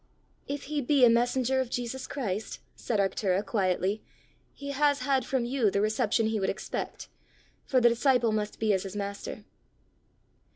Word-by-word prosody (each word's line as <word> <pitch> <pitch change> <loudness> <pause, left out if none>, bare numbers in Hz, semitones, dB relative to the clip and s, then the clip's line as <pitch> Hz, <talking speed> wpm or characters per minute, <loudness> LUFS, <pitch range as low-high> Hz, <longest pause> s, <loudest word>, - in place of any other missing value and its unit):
"If 285 0 -4
he 295 +1 -2
be 270 0 +5
a 235 - +6
messenger 250 +2 +2
of 255 - -4
Jesus 245 +1 -4
Christ," 215 -6 -4 0.2
said 220 -4 -2
Arctura, 195 0 +1
quietly, 195 0 0 0.5
"he 280 0 -7
has 285 0 +2
had 270 -3 +1
from 260 -3 0
you 240 -3 +2
the 200 - 0
reception 215 +1 +1
he 220 0 0
would 195 - 0
expect, 195 - -5 0.6
for 260 - +3
the 240 -1 +6
disciple 240 -1 +2
must 210 -1 -2
be 220 -2 +2
as 190 - +1
his 195 +1 -7
master." 200 +1 -5
230 Hz, 165 wpm, -28 LUFS, 205-265 Hz, 0.6 s, a